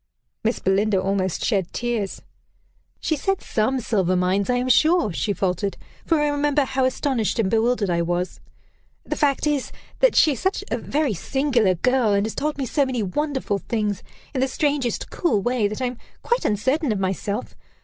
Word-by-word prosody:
Miss 230 +2 +1
Belinda 195 +1 +2
almost 190 -1 -1
shed 195 -6 0
tears. 235 -5 -2 0.8
"She 315 - 0
said 390 +6 -1
'some 245 +5 0
silver 190 -5 +1
mines,' 185 +3 +1
I 250 - +3
am 250 +1 0
sure," 315 - +4
she 205 - -1
faltered; 195 +1 -1 0.3
"for 325 -2 +3
I 295 - +2
remember 290 0 +2
how 265 0 0
astonished 260 -4 0
and 205 -4 +1
bewildered 225 -3 +2
I 170 0 +1
was. 175 +2 -2 0.6
The - - -3
fact 285 -2 +1
is, 295 -3 0 0.3
that - - +4
she 310 - +6
is 270 - -3
such 380 +1 -1
a - - +1
very 290 -5 0
singular 240 - +1
girl, 250 +2 +2
and 200 +1 +2
has 220 - -3
told 300 0 -2
me 275 - -2
so 280 +4 +1
many 255 -4 -1
wonderful 265 0 -1
things, 210 -4 -2 0.3
in 260 - -1
the 265 - +3
strangest, 280 -3 -1
cool 245 - +1
way, 240 0 +1
that 215 +5 -4
I - - +2
am 245 -1 -4 0.2
quite 475 +1 0
uncertain 260 +7 +1
of 210 - 0
myself. 195 +4 -2
240 Hz, 185 wpm, -23 LUFS, 200-280 Hz, 0.8 s, she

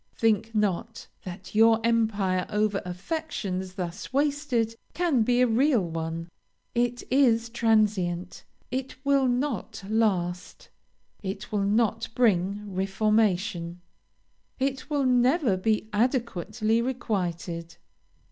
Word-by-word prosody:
Think 225 0 +1
not 210 +2 -1 0.2
that 180 +1 -8
your 225 +1 +5
empire 210 -6 +1
over 210 -1 +1
affections 185 - -4
thus 180 +2 -5
wasted 275 -5 0 0.2
can 325 -8 +2
be 245 +2 +3
a - - +6
real 245 -1 +3
one. 165 0 -4 0.5
It 245 0 0
is 235 -4 +3
transient, 210 -6 +1 0.3
it 260 +1 -3
will 275 -1 +3
not 245 -5 -2
last 190 -5 -1 0.5
it 195 -1 -5
will 210 - 0
not 220 +1 +1
bring 200 -3 +1
reformation 195 -3 0 0.8
it 270 +1 -2
will 290 -2 +1
never 250 - +3
be 215 +3 0
adequately 225 - 0
requited. 175 -9 -3
220 Hz, 105 wpm, -27 LUFS, 185-245 Hz, 0.8 s, a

